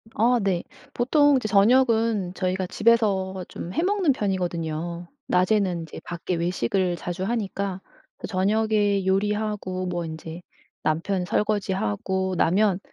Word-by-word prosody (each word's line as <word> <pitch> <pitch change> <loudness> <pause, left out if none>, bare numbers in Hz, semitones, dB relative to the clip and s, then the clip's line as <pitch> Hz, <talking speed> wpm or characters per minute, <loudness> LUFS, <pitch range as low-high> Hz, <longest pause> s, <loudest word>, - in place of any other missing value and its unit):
아 240 +2 +3
네. 185 -3 0 0.3
보통 290 +3 +4
이제 230 - -2
저녁은 220 -2 +3
저희가 185 0 -1
집에서 195 -4 +1
좀 175 - -7
해 325 - 0
먹는 380 -4 +2
편이거든요. 175 -5 -3 0.2
낮에는 180 -2 +2
이제 160 - -9
밖에 175 +1 -4
외식을 175 +1 0
자주 175 +2 -5
하니까 200 -3 -2 0.5
저녁에 205 0 +1
요리하고 200 -1 -1
뭐 175 -1 -2
인제 160 +1 -7 0.4
남편 175 +4 0
설거지하고 190 - -1
나면 190 +3 +3
190 Hz, 270 characters per minute, -24 LUFS, 180-215 Hz, 0.5 s, 보통